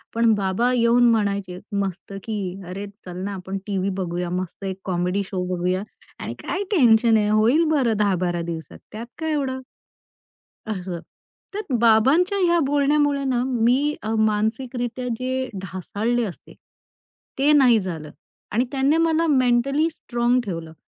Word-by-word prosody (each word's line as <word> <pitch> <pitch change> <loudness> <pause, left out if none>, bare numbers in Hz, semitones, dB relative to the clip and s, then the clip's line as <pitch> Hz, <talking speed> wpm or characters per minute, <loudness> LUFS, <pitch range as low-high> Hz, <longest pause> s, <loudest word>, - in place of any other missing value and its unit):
पण 230 -1 +4
बाबा 200 +5 +1
येऊन 240 0 +4
म्हणायचे 200 -4 -1 0.2
मस्त 195 0 -3
की 225 - -4 0.3
"अरे 190 +3 -5 0.2
चल 180 -1 -7
ना 200 +1 -3
आपण 190 0 -5
टीव्ही 195 -1 -1
बघूया, 175 -1 -2
मस्त 180 +2 -4
एक 190 0 -4
कॉमेडी 180 +2 0
शो 185 -2 -3
बघूया 180 +2 -1 0.4
आणि - - -5
काय 400 - -3
टेन्शन 230 - +5
आहे 210 -1 +1
होईल 225 +9 +4
बरं 250 -8 +2
10-12 180 -4 +1
दिवसात 165 -1 -6
त्यात 225 +2 -7
काय 320 0 -1
एवढं?" 265 -3 -2 1.1
असं. 185 -5 -4 0.5
तर 415 - -2 0.2
बाबांच्या 270 - +4
ह्या 345 -2 +3
बोलण्यामुळे 285 0 +2
ना 250 -2 +1
मी 260 +4 +2
अ, 220 +1 -2
मानसिकरीत्या 230 +3 -1
जे 260 0 -2
ढासळले 205 +6 -2
असते, 190 - -9 0.8
ते 280 +3 +4
नाही 255 -6 +6
झालं. 165 -6 -5 0.4
आणि 240 +4 +1
त्याने 275 +3 +2
मला 330 0 +2
मेंटली 275 +2 +2
स्ट्राँग 240 -5 0
ठेवलं 165 -4 -5
225 Hz, 140 wpm, -23 LUFS, 190-260 Hz, 1.1 s, नाही